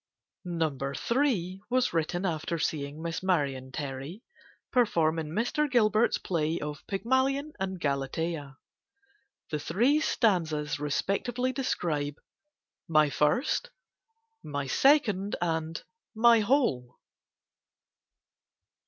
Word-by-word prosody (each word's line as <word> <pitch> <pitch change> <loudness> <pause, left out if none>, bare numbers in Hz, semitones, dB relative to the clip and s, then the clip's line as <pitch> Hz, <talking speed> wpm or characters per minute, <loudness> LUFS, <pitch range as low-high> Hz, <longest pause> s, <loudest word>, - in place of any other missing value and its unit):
No. 165 -4 -1 0.4
III. 200 -9 +1
was 255 0 +1
written 175 +3 -1
after 165 -1 -2
seeing 145 0 -3
Miss 165 -1 -3
Marion 140 -8 0
Terry 140 - -6 0.5
perform 165 -10 +2
in 155 -1 -4
Mr. 245 - 0
Gilbert's 220 -2 +3
play 165 -2 -1
of 150 -1 -6
"Pygmalion 260 +8 0
and 190 -1 -3
Galatea." 140 0 -2 0.9
The 150 - -1
three 245 - +2
stanzas 160 - +1
respectively 210 - -1
describe 155 - -1 0.7
"My 155 -2 +4
First," 250 - +1 0.7
"My 145 -1 -3
Second," 210 - +3
and 165 -1 -2 0.3
"My 230 +1 +6
Whole." 205 - +1
170 Hz, 95 wpm, -29 LUFS, 150-235 Hz, 0.9 s, My